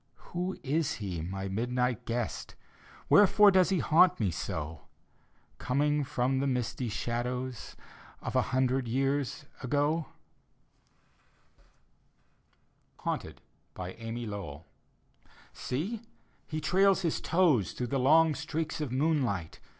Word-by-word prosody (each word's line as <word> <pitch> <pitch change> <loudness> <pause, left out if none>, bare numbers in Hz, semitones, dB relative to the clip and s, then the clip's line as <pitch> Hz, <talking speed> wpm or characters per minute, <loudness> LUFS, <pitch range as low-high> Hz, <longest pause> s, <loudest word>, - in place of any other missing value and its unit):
Who 180 +2 -2
is 150 +2 0
he, 95 -6 -4
my 95 +4 -4
midnight 125 +4 -1
guest? 120 0 -3 0.5
Wherefore 205 0 +7
does 185 -2 +4
he 190 - +2
haunt 175 +3 +4
me 100 -5 +1
so; 80 -5 -5 0.7
Coming 145 +3 +1
from 130 0 0
the 140 - 0
misty 125 -1 -1
^ladows 125 +3 -3 0.4
Of - - -5
a - - +5
hundred 130 0 +1
years 135 +4 -1 0.2
i^? 145 +5 +1 3.0
HAUNTED: - - -4 0.4
amy 115 +6 -5
lowbll 95 -8 -6 0.9
Seel 185 - -3 0.5
He 155 - -3
trails 195 +3 +3
his 165 - 0
toes 155 - +2
Through 125 - -3
the 135 - +2
long 155 +4 +5
streaks 155 +3 -3
of 145 -5 -3
moonlight. 130 - 0
130 Hz, 110 wpm, -30 LUFS, 115-155 Hz, 3.0 s, Wherefore